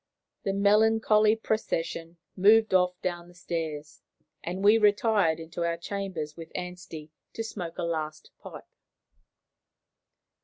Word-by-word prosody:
The 195 - 0
melancholy 215 +1 +4
procession 170 -6 -3 0.2
moved 215 +2 +5
off 180 -1 +2
down 175 -1 -3
the 175 - -18
stairs, 160 -4 -5 0.4
and 180 +3 -4
we 210 +2 +6
retired 205 -5 +3
into 165 +1 -5
our 170 0 -1
chambers 170 -4 -5
with 165 -1 -10
Anstey 180 -4 -7 0.2
to 225 - -4
smoke 180 -7 -6
a 175 - -3
last 155 -2 -4
pipe. - - -10
180 Hz, 120 wpm, -27 LUFS, 165-210 Hz, 0.4 s, we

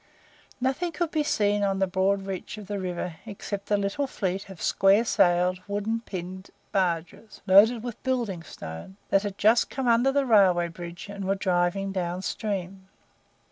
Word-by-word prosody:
Nothing 265 +7 -1
could 340 -2 -2
be 310 - +1
seen 205 -8 +1
on 195 -1 +1
the 190 - +2
broad 190 +1 +1
reach 195 +2 -5
of 210 - -8
the 200 0 -4
river 180 -2 -4
except 200 -1 -6
a 205 - +3
little 200 +8 -1
fleet 195 -5 -3
of 190 -4 -10
square 195 +4 +3
sailed, 180 -2 +2
wooden 205 +3 -1
pinned 185 -3 -7 0.2
barges, 180 +2 -2
loaded 215 +4 +6
with 240 -2 -6
building 235 -9 -1
stone, 80 - -9
that 195 - +4
had 200 -1 -5
just 220 +3 +4
come 265 -2 -3
under 240 +3 +4
the 280 0 +1
railway 185 -7 +4
bridge, 170 +1 -8
and 200 -1 -6
were 195 +1 +1
driving 185 +1 0
down 180 -1 -3
stream. 195 -3 -4
195 Hz, 170 wpm, -26 LUFS, 185-220 Hz, 0.2 s, loaded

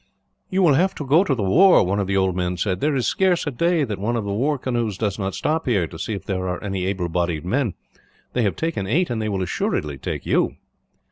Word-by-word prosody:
"You 190 -2 +1
will 160 -5 +5
have 180 +7 +2
to 145 - -5
go 155 +7 +5
to 145 -9 0
the 110 - -2
war," 175 - +6
one 95 +3 0
of 100 - -1
the 95 0 +1
old 95 -2 +1
men 90 0 -1
said. 95 0 -1
"There 150 +4 +1
is 125 -4 0
scarce 185 +5 +2
a 145 - -1
day 170 +4 +1
that 105 -8 -3
one 115 +4 -1
of 115 - -1
the 100 - -2
war 140 +8 +1
canoes 120 -6 -2
does 105 -1 -2
not 95 -1 -2
stop 160 -1 -1
here, 100 -8 +2
to 80 0 -10
see 110 - -3
if 95 -1 -8
there 95 -2 -2
are 90 +2 -4
any 95 -2 -2
able 95 -3 -1
bodied 85 -2 -1
men. 120 +1 0 0.6
They 125 - +1
have 105 -4 +1
taken 160 -13 -2
eight, 165 - +1
and 115 -2 -1
they 110 - -1
will 95 -2 -1
assuredly 75 -5 -2
take - - -4
you." - - +1
105 Hz, 260 wpm, -22 LUFS, 95-145 Hz, 0.6 s, war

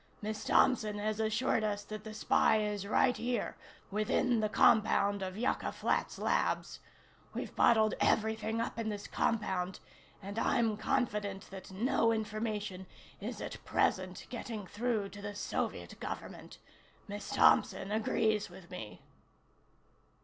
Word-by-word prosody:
Miss 215 0 -4
Thompson 215 -5 +3
has 215 +1 -2
assured 220 +1 +1
us 205 -1 -1
that 215 0 -7
the 215 0 -8
spy 220 - +3
is 210 -2 -2
right 250 +4 +3
here, 240 -2 -2 0.4
within 215 +3 +2
the 215 -1 +1
compound 205 -2 +4
of 190 0 -4
Yucca 245 +4 0
Flats - - -1
Labs. - - 0 0.6
We've - - -5
bottled 220 -2 +5
everything 220 +1 +1
up 230 0 -2
in 225 -1 -1
this 205 -1 -5
compound, 190 -5 -1 0.4
and 200 +3 -5
I'm 225 -2 +2
confident 210 -5 -1
that 190 -1 -9
no 230 +3 +2
information 215 -3 -3 0.3
is - - -5
at - - -6
present - - 0
getting 220 -4 -5
through 215 0 -1
to 205 +1 -10
the 205 0 -5
Soviet - - -3
Government. - - -7 0.5
Miss 205 0 -6
Thompson 195 +1 +4
agrees 220 -1 +1
with 175 -2 -13
me." 105 -1 -8
215 Hz, 135 wpm, -33 LUFS, 205-220 Hz, 0.6 s, bottled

